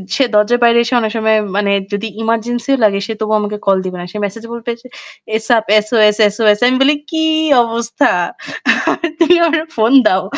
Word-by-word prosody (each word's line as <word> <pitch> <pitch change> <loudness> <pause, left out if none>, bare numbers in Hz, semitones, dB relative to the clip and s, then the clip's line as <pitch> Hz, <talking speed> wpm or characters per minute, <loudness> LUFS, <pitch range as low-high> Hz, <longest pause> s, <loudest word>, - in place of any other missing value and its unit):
সে 275 - +2
দরজার 225 +4 +2
বাইরে 235 0 +4
এসে 240 - -4
অনেক 220 -2 -2
সময় 220 0 +2 0.2
মানে 200 -1 0 0.2
যদি 210 +2 -3 0.2
এমার্জেন্সিও 240 +4 -1
লাগে 200 -2 +2
সে 225 - -4
তবুও 215 0 -1
আমাকে 210 0 -4
কল 195 -1 +3
দিবে 185 -1 -5
না। - - -7
সে 210 - -8
মেসেজ 220 +3 -8
বলবে 235 0 -5
যে 255 - -14 0.5
"ASAP, 225 0 +1 0.2
S-O-S, 215 -2 +3 0.2
S-O-S" 210 -1 +2
আমি 255 - +2
বলি 290 +2 +4
"কি 320 -1 -2 0.4
অবস্থা? 235 +4 -1 1.1
তুমি 340 +1 +4
আমারে 320 -1 0
ফোন 225 +4 +2
দাও।" 185 0 +1
225 Hz, 180 wpm, -14 LUFS, 210-240 Hz, 1.1 s, বাইরে